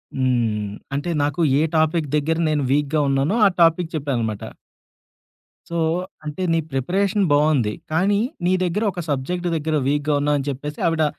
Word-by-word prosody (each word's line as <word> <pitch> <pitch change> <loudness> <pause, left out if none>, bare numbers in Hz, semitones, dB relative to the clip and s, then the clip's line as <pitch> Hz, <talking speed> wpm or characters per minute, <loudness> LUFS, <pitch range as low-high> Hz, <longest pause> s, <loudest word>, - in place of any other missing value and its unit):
హ్మ్. 115 -6 0 0.2
అంటే 145 +5 -2
నాకు 145 +3 -1 0.2
ఏ - - +3 0.2
టాపిక్ 160 0 +1
దగ్గర 155 +2 +1
నేను 150 -2 +1
వీక్‌గా 145 +2 +1
ఉన్నానో, 135 +8 +1
ఆ - - +8
టాపిక్ 165 +1 +3
చెప్పాననమాట. 120 -8 -2 1.3
సో, 170 - -3 0.5
అంటే 150 +5 -4
నీ 165 - +2
ప్రిపరేషన్ 195 - +1
బావుంది. 145 -7 +2 0.2
కానీ, 195 +6 +2 0.3
నీ 180 - +3
దగ్గర 185 +5 0
ఒక 175 - -5
సబ్జెక్ట్ 175 +6 -2
దగ్గర 155 0 -1
వీక్‌గా 145 +1 +1
ఉన్నావని 145 -1 0
చెప్పేసి, 145 +2 -5
ఆవిడ, 165 -1 +1
150 Hz, 145 wpm, -22 LUFS, 135-170 Hz, 1.3 s, ఆ